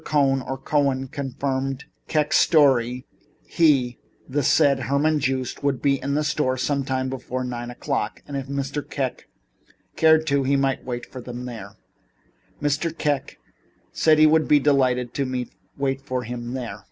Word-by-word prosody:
Cohn 135 -3 +2
or 135 +1 -5
Cohen 135 -1 0
confirmed 135 0 -3
Mr. - - -41
Kek's 150 -1 +2
story 130 -5 +3 0.4
he, 135 -7 +2 0.3
the 145 +3 0
said 140 +1 +4
Herman 140 +4 +1
Joost, 130 -2 -2
would 140 -3 0
be 140 -1 +1
at 140 - -2
the 150 - +1
store 150 -4 0
sometime 130 -1 -1
before 130 -1 -4
nine 120 -1 -5
o'clock, 120 - -3
and 145 - -6
if 135 -1 -4
Mr. 140 +1 -3
Kek 135 -3 -4 0.7
cared 160 0 +5
to, 140 -2 +2
he 135 +1 +1
might 135 -1 +1
await 120 -1 -6
him 125 -1 -7
there. 110 -5 -8 0.8
Mr. 150 +3 -1
Kek 145 -3 -1 0.5
said 155 -1 +3
he 155 - +7
would 155 0 +4
be 150 - +5
delighted 130 -4 +2
to 130 -3 -2 0.3
wait 135 -1 -1
for 130 -2 -3
him 120 +1 -5
there. 125 -3 -5
135 Hz, 155 wpm, -23 LUFS, 130-145 Hz, 0.8 s, he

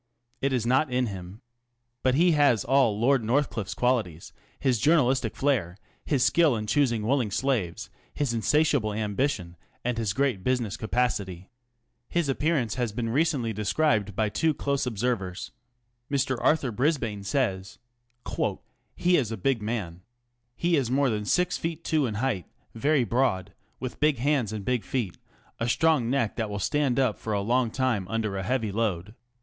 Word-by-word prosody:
It 140 - +1
is 125 -3 0
not 130 +5 +2
in 125 0 +1
him. 95 -1 -7 0.6
But 130 0 +2
he 175 +4 +4
has 145 -8 +3
all 125 -5 +3
Lord 130 +1 +3
North 130 +6 +1
cliffe's 110 -4 -4
qualities 115 -10 -1
ŌĆö - - -33 0.2
his 125 -4 +1
journalistic 135 -6 +2
flairt\ 110 -11 0 0.3
his 135 -5 +1
skill 165 -7 +4
in 110 -1 -3
choosing 115 -2 +1
willing 125 -2 +1
slaves, 105 -6 -1 0.2
his 140 -5 -1
insatiable 140 -1 +2
ambition, 105 -4 -2 0.3
and 120 -1 -1
his 105 -4 -1
great 125 -6 0
business 125 -4 0
capacity. 105 -6 -2 0.6
His 170 -4 0
appearance 135 -5 0
has 120 -4 -1
been 115 +2 -3
recently 135 -5 +1
described 105 -1 +1
by 110 +1 +1
two 160 +7 +1
close 140 -2 -1
observers. 105 -5 -2 0.6
Mr. 140 -2 +1
Arthur 145 -5 +2
Brisbane 115 -5 -1
says: 100 -5 -1 0.5
ŌĆö - - -1 0.4
He 180 0 +3
is 120 -6 0
a 115 - -3
big 115 +4 0
man. 105 -6 -4 0.5
He 170 +3 +1
is 130 -5 0
more 135 0 +2
than 105 -1 -2
six 180 +8 +1
feet 165 0 -4
two 155 -5 +1
in 110 - -4
height, 110 - -1 0.3
very 140 +4 +2
broad, 105 -5 0 0.3
with 130 -1 -6
big 150 -2 +3
hands 130 -4 +1
and 105 -3 -5
big 125 -3 0
feet, 110 -2 -3 0.4
a 115 - -1
strong 155 -4 +2
neck 125 -5 0
that 110 -3 -1
will 100 - -4
stand 135 +5 +1
up 125 -5 +1
for 110 - -3
a 100 - 0
long 120 +3 +1
time 120 -6 -1
under 110 -1 -2
a 95 - -2
heavy 110 +1 -1
load. 105 -2 -2
120 Hz, 170 wpm, -27 LUFS, 105-140 Hz, 0.6 s, he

